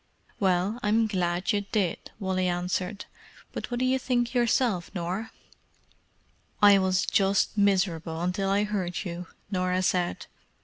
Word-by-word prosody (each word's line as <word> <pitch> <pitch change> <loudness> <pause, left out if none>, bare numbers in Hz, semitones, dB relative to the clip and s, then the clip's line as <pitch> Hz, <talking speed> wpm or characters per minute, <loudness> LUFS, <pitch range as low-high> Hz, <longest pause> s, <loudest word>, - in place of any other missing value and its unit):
"Well, 190 +3 +1
I'm 220 +2 +2
glad 180 -1 0
you 205 -2 +1
did," 200 -3 -2
Wally 190 -2 0
answered, 180 +3 -2 0.5
"But - - -5
what 240 -1 -2
do 255 - +1
you 260 +1 +2
think 245 -2 0
yourself, 235 -6 +1
Nor?" 185 +5 -3 1.3
"I 205 -1 +7
was 185 -1 +1
just 195 +1 +2
miserable 180 -5 +1
until 180 +3 -1
I 200 +1 +2
heard 200 -3 -2
you," 175 0 -5 0.2
Norah 185 -1 0
said. 180 - 0
190 Hz, 135 wpm, -27 LUFS, 180-210 Hz, 1.3 s, I